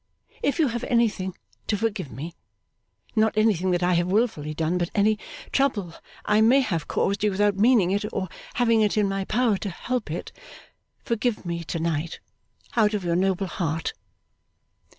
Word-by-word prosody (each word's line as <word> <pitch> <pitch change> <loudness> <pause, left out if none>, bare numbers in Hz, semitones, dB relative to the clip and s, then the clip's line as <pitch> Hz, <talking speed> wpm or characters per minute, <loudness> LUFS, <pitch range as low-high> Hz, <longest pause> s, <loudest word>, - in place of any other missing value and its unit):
If 285 - +1
you 310 -6 +3
have 235 0 -3
anything 210 -7 +1 0.3
to 210 - +1
forgive 200 - -2
me 160 +6 -6 0.8
(not 220 -1 +2
anything 205 -4 +3
that 175 -1 +1
I 180 +1 +3
have 175 0 +2
wilfully 185 -7 0
done, 165 +3 0
but 175 -1 -1
any 210 +1 +3 0.3
trouble 205 -11 +1 0.3
I 210 +1 +3
may 250 +5 +6
have 170 - -2
caused 200 +1 0
you 210 - +4
without 205 +1 +2
meaning 210 -3 +4
it, 205 +1 0
or 185 - -2 0.3
having 230 -2 +3
it 210 0 +2
in 210 -1 +3
my 195 0 -2
power 230 -2 +2
to 205 - -3
help 235 +3 -3
it), 165 - -5 0.7
forgive 230 -3 -1
me 170 -1 -3
to 165 - -3
night 165 0 -2 0.6
out 215 -2 +3
of 200 - -2
your 170 -1 +1
noble 190 +1 +1
heart! 165 -3 -2
200 Hz, 170 wpm, -25 LUFS, 175-220 Hz, 0.8 s, may